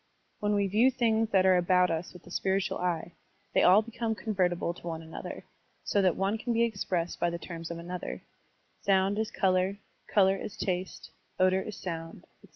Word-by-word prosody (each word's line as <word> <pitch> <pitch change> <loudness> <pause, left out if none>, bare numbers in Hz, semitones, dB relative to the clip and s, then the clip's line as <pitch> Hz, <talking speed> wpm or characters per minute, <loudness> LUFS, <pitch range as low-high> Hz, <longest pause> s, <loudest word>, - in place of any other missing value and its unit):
When 210 0 +1
we 200 -1 +2
view 215 +7 +4
things 225 -3 +1
that 190 -3 +3
are 185 -1 +6
about 180 0 +3
us 165 +2 -3
with 180 - -14
the 175 - -14
spiritual 190 +1 0
eye, 175 -1 -1 0.4
they - - +4
all 195 +4 +6
become 230 0 -3
convertible 180 -6 0
to 175 - -11
one 165 -1 -4
another, 160 - -8 0.4
so 200 - +1
that 185 -3 +3
one 195 +3 0
can 240 +1 -1
be 230 +1 +3
expressed 190 -6 -2
by 175 - +2
the 170 - -3
terms 165 -1 -7
of 170 - -5
another: 175 +1 -6 0.6
sound 195 +1 +2
is 220 - -1
color, 185 +1 +1 0.3
color 195 -2 +4
is 195 - -7
taste, 185 0 -3 0.3
odor 185 +1 +4
is 210 +1 -6
sotmd, 165 -2 -6 0.2
etc. - - -17
190 Hz, 190 wpm, -29 LUFS, 175-205 Hz, 0.6 s, are